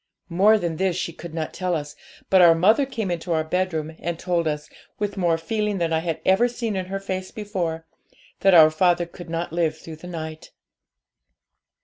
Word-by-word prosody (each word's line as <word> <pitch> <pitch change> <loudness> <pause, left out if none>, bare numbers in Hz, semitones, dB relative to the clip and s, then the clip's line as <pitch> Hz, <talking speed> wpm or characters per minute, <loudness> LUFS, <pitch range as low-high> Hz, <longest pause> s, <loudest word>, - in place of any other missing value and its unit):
More 200 +6 +5
than 170 -5 -3
this 190 -1 0
she 170 - -3
could 170 0 -9
not 160 -1 -3
tell 180 -1 -1
us, 150 -2 -5 0.4
but 190 -1 +6
our 170 -2 +7
mother 215 - +4
came 220 -8 -3
into 170 0 -2
our 160 -1 +1
bedroom, 160 -2 -2
and 170 0 -3
told 170 -2 -1
us, 150 -1 -3 0.3
with 205 -1 -3
more 175 -4 +1
feeling 210 +4 -2
than 165 -2 0
I 160 - +2
had 165 -1 -3
ever 195 +6 +4
seen 235 -3 -3
in 185 -1 -3
her 195 +1 -3
face 185 -1 -4
before, 180 -7 -4 0.5
that 195 -2 +5
our 155 -2 +8
father 175 +1 +2
could 175 0 -12
not 165 0 -3
live 165 -2 0
through 160 -1 -10
the 180 - -11
night. 160 -2 -7
175 Hz, 200 wpm, -23 LUFS, 165-190 Hz, 0.5 s, our